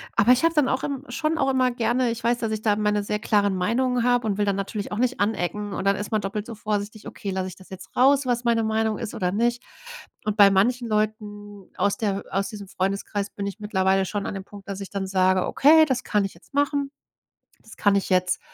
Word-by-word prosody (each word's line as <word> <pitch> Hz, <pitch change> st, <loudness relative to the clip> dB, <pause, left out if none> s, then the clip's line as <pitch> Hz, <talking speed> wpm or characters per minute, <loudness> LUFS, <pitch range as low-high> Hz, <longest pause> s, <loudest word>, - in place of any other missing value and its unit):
Aber 235 Hz, +5 st, +5 dB
ich 255 Hz, -, 0 dB
habe 330 Hz, -, +3 dB
dann 295 Hz, -3 st, +3 dB
auch 260 Hz, -, -1 dB
im 280 Hz, -1 st, -4 dB
schon 325 Hz, 0 st, -1 dB
auch 270 Hz, -, +1 dB
immer 255 Hz, -1 st, +2 dB
gerne 240 Hz, +1 st, +1 dB
ich 230 Hz, 0 st, -6 dB
weiß, 235 Hz, +1 st, +2 dB
dass 225 Hz, -2 st, -2 dB
ich 215 Hz, -, -3 dB
da 210 Hz, -2 st, +3 dB
meine 210 Hz, -1 st, +1 dB
sehr 210 Hz, +1 st, -2 dB
klaren 205 Hz, -2 st, +1 dB
Meinungen 245 Hz, +6 st, +1 dB
habe 245 Hz, -1 st, +2 dB
und 200 Hz, -1 st, -1 dB
will 205 Hz, -, +1 dB
dann 200 Hz, -1 st, +1 dB
natürlich 200 Hz, +1 st, -4 dB
auch -, -, -3 dB
nicht 255 Hz, +1 st, 0 dB
anecken 205 Hz, 0 st, -1 dB
und 190 Hz, -, -4 dB
dann 195 Hz, 0 st, +3 dB
ist 205 Hz, -, -5 dB
man 215 Hz, -1 st, +1 dB
doppelt 205 Hz, +1 st, -4 dB
so 230 Hz, -, -7 dB
vorsichtig: 210 Hz, 0 st, -4 dB
„Okay, 195 Hz, -, -6 dB
lasse 185 Hz, 0 st, -2 dB
ich 180 Hz, -, -11 dB
das 190 Hz, -, -16 dB
jetzt 190 Hz, -1 st, -11 dB
raus, 275 Hz, +2 st, +4 dB
was 245 Hz, -1 st, -1 dB
meine 230 Hz, -1 st, +2 dB
Meinung 220 Hz, 0 st, 0 dB
ist 230 Hz, -, -5 dB
oder 180 Hz, -3 st, -1 dB
nicht?“ 240 Hz, +3 st, +1 dB, 0.6 s
Und 215 Hz, 0 st, -1 dB
bei 200 Hz, -1 st, +8 dB
manchen 235 Hz, +5 st, +2 dB
Leuten 205 Hz, -2 st, -3 dB
aus 200 Hz, 0 st, +1 dB
der 200 Hz, -4 st, -1 dB
aus 195 Hz, +1 st, 0 dB
diesem 205 Hz, -3 st, -8 dB
Freundeskreis 200 Hz, +2 st, -2 dB
bin 200 Hz, -, -5 dB
ich 200 Hz, +2 st, -6 dB
mittlerweile 190 Hz, -2 st, +1 dB
schon 200 Hz, +1 st, -3 dB
an -, -, -4 dB
dem 190 Hz, -1 st, -6 dB
Punkt, 200 Hz, -1 st, -13 dB
dass 200 Hz, -1 st, -4 dB
ich 195 Hz, -, -7 dB
dann 195 Hz, -1 st, -3 dB
sage: 185 Hz, -1 st, +2 dB
„Okay, 315 Hz, +3 st, +6 dB
das 255 Hz, -2 st, -1 dB
kann 210 Hz, -1 st, +1 dB
ich 195 Hz, -, -6 dB
jetzt 170 Hz, -, -22 dB
machen. 285 Hz, 0 st, 0 dB, 0.7 s
Das 225 Hz, -, -15 dB
kann 205 Hz, -1 st, +3 dB
ich 195 Hz, -, -1 dB
jetzt, 180 Hz, -1 st, +2 dB
210 Hz, 245 wpm, -24 LUFS, 200-240 Hz, 0.7 s, bei